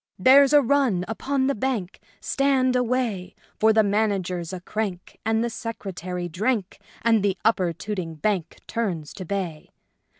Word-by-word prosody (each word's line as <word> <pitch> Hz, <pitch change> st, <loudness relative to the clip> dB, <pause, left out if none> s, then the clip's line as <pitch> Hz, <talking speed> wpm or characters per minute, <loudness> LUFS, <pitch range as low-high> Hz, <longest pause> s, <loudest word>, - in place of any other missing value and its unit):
" -, -, -59 dB
There's 270 Hz, +7 st, +6 dB
a 295 Hz, -1 st, +6 dB
run 240 Hz, -9 st, +2 dB
upon 265 Hz, +4 st, -1 dB
the 275 Hz, -, +2 dB
Bank 220 Hz, -6 st, -2 dB
— -, -, -32 dB
Stand 265 Hz, -2 st, +1 dB
away! 240 Hz, -7 st, -1 dB, 0.2 s
For 220 Hz, +1 st, +5 dB
the 220 Hz, 0 st, +4 dB
Manager's 195 Hz, -4 st, 0 dB
a 185 Hz, -, -5 dB
crank 190 Hz, -1 st, -5 dB
and 225 Hz, +1 st, +1 dB
the 235 Hz, -, -1 dB
Secretary 185 Hz, -6 st, -5 dB
drank, 200 Hz, +3 st, -1 dB, 0.2 s
and 225 Hz, -2 st, +4 dB
the 195 Hz, -1 st, 0 dB
Upper 190 Hz, -6 st, +3 dB
Tooting 175 Hz, -1 st, -5 dB
Bank 185 Hz, +1 st, -2 dB
Turns 185 Hz, -10 st, -3 dB
to 185 Hz, -, -7 dB
bay 175 Hz, -5 st, -4 dB
210 Hz, 160 wpm, -24 LUFS, 180-245 Hz, 0.2 s, There's